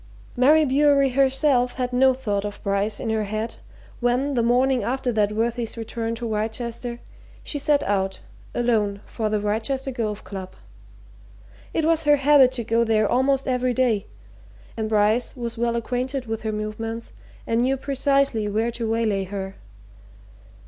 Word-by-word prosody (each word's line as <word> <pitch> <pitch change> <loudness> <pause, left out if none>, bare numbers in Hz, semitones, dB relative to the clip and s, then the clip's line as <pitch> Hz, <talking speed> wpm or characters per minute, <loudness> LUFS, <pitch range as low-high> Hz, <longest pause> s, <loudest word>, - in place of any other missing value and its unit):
Mary 300 +5 +5
Bewery 280 0 +4
herself 265 -1 +2
had 250 -1 -2
no 260 +1 +5
thought 215 -6 -2
of 205 -1 -5
Bryce 200 +1 0
in 225 - -2
her 220 -1 0
head 215 +3 -4 0.4
when, 250 +4 +1
the 240 - +2
morning 250 +2 +2
after 250 +3 -1
that 210 -2 +1
worthy's 230 +2 -2
return 230 0 -3
to 235 0 -4
Wrychester, 230 +2 -3 0.4
she 290 - -4
set 290 0 +2
out, 190 -1 -1 0.4
alone, 215 -4 +1
for 220 -2 -3
the 210 0 0
Wrychester 225 +6 -1
Golf 215 -4 -3
Club. 190 -2 -8 1.2
It 320 - 0
was 325 -1 +2
her 295 0 +6
habit 280 -2 +5
to 240 -2 -3
go 230 +1 +2
there 215 -2 +2
almost 270 +3 +1
every 250 -1 0
day, 235 -6 +1 0.7
and 220 -1 -3
Bryce 215 +4 +2
was 235 -1 -4
well 235 0 0
acquainted 250 +3 -2
with 225 -1 -4
her 220 - -2
movements 225 +2 -5 0.3
and 230 +1 +1
knew 265 +2 +1
precisely 275 -4 +1
where 220 +3 0
to 230 -1 -3
waylay 220 -4 0
her. 190 0 -5
235 Hz, 155 wpm, -23 LUFS, 215-260 Hz, 1.2 s, her